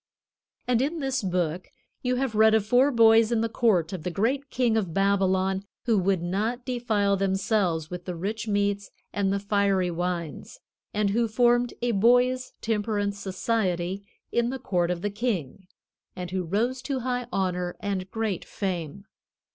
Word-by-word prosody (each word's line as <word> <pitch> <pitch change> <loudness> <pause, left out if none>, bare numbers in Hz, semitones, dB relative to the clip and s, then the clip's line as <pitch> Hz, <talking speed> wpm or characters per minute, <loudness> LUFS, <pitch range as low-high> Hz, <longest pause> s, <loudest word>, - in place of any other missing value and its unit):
And 245 -1 +2
in 300 +5 -1
this 270 -4 -1
Book 180 -2 -1 0.3
you 250 0 0
have 260 -2 -1
read 220 +1 +5
of 215 -2 +2
four 250 +5 +4
boys 225 -2 +5
in 230 -2 +2
the 230 - +1
court 210 -7 +1
of 185 - -4
the 180 - -3
great 255 +10 -1
king 240 -3 +1
of 190 -7 -1
Babylon 190 -1 +2 0.2
who 230 -2 +3
would 190 -2 +1
not 215 +7 -2
defile 225 -6 +1
themselves 190 -4 0
with 180 0 -6
the 180 - -4
rich 210 +6 -4
meats 200 -1 0 0.2
and 195 -1 +1
the 200 - +1
fiery 200 -2 +1
wines, 170 -3 -4 0.3
and 205 -1 +1
who 230 +2 +2
formed 240 +2 +2
a 245 - +2
boys' 245 +4 +3
temperance 205 -2 -1
society 190 -2 -1 0.3
in 235 0 +1
the 265 - -3
court 175 -8 0
of 180 -1 -2
the 205 - -1
king, 200 - -3 0.5
and 180 -1 -6
who 185 -1 -2
rose 235 +9 0
to 265 0 -3
high 245 0 -2
honor 180 -3 -1
and 195 -2 -3
great 220 -5 -2
fame. 185 -1 -4
205 Hz, 165 wpm, -26 LUFS, 185-235 Hz, 0.5 s, read